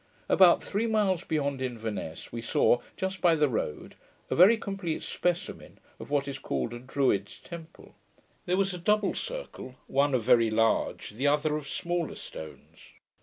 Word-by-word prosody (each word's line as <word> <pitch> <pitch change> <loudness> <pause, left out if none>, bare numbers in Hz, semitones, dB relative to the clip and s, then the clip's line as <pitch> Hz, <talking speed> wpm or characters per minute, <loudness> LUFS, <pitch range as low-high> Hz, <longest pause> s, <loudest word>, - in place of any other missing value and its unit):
About 180 -3 +6
three 215 +4 -1
miles 200 -5 +1
beyond 140 -4 -1
Inverness, 110 -9 -5
we 115 - -5
saw, 120 +1 +3 0.2
just 190 -1 -3
by 170 -2 +5
the 150 -1 +3
road, 110 - -3 0.4
a - - +2
very 195 +7 +7
complete 195 -6 -4
specimen 175 -1 -3 0.2
of - - -9
what 140 -1 0
is 140 - -5
called 120 - -3
a 120 - -6
Druid's 130 -6 0
temple. 170 -2 -11 0.5
There 180 +1 +2
was 195 -1 +1
a 180 - -6
double 210 +2 +2
circle, - - -6
one 140 0 +2
of 120 - 0
very 115 -1 +4
large, 115 -1 +1
the 125 +7 -1
other 150 +1 +2
of 150 -2 -5
smaller 175 -1 -2
stones. 80 -1 -10
150 Hz, 165 wpm, -28 LUFS, 125-185 Hz, 0.5 s, very